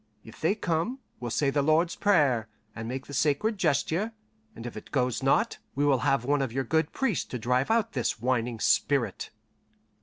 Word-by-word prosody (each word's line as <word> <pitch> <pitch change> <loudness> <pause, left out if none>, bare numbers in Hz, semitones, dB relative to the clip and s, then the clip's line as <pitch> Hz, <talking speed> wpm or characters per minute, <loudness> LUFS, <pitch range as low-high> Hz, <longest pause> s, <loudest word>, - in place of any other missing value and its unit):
If 110 - -14
they 165 +6 +2
come, 175 +6 -1 0.2
we'll 120 - -4
say 140 +4 +1
the 145 - +1
Lord's 160 +4 +2
Prayer, 145 - +3 0.3
and 110 0 -5
make 130 +2 -4
the 145 - -10
sacred 155 - +1
gesture, 175 +6 +1 0.4
and 115 - -9
if 120 - -6
it 105 - -9
goes 125 -3 0
not, 135 +1 +2 0.2
we 145 +2 +1
will 140 -3 +3
have 135 -3 +1
one 145 +1 +2
of 135 -4 -1
your 135 +3 -1
good 160 +4 0
priests 235 -9 0
to 125 - -5
drive 125 +3 0
out 225 -1 +2
this 125 -3 -1
whining 120 -1 -1
spirit." - - +1
140 Hz, 190 wpm, -28 LUFS, 125-165 Hz, 0.4 s, Prayer